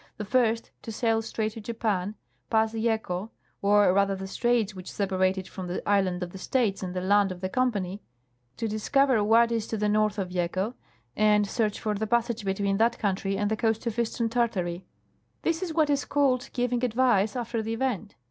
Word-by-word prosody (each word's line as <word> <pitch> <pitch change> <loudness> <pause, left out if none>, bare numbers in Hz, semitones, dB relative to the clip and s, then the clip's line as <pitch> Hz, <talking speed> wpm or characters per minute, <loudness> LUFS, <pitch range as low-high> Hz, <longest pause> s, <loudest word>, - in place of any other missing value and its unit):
The 210 - -4
first, 230 0 +1
to 225 - -7
sail 225 0 +1
straight 220 -1 -2
to 225 - -9
Japan, 210 -3 -2 0.3
pass 220 0 +2
Yeco, 220 -3 -1 0.3
or 205 -2 +4
rather 200 0 +2
the 190 0 -6
straits 225 +1 0
which 185 -1 -8
separate 190 -1 +1
it 190 - -5
from 185 -2 -7
the 175 - -4
island 190 -3 +2
of 175 - -6
the 190 - -9
States 220 -1 0
and 185 -1 -5
the 180 - -1
land 200 +1 +3
of 180 - -7
the 185 0 -3
Company, 205 -6 -1 0.6
to 225 - -2
discover 230 +2 +2
what 230 +2 +4
is 225 -2 -1
to 220 - -3
the 210 0 0
north 215 0 +2
of 190 -3 -2
Yeco 185 +5 -1 0.4
and 210 -1 +4
search 215 0 -1
for 215 -1 -1
the 215 +1 -2
passage 235 -1 0
between 195 0 0
that 230 +2 +2
country 195 -1 -1
and 205 +1 0
the - - +2
coast 225 0 0
of 230 0 -2
eastern 235 0 0
Tartary. 195 -7 -1 0.6
This 335 +1 0
is 365 -3 -2
what 315 -1 +2
is 285 0 +1
called 270 -3 +1
giving 245 0 -1
advice 235 -4 +2
after 235 -2 -2
the 225 +1 -3
event. 225 -5 -2
215 Hz, 200 wpm, -27 LUFS, 195-235 Hz, 0.6 s, or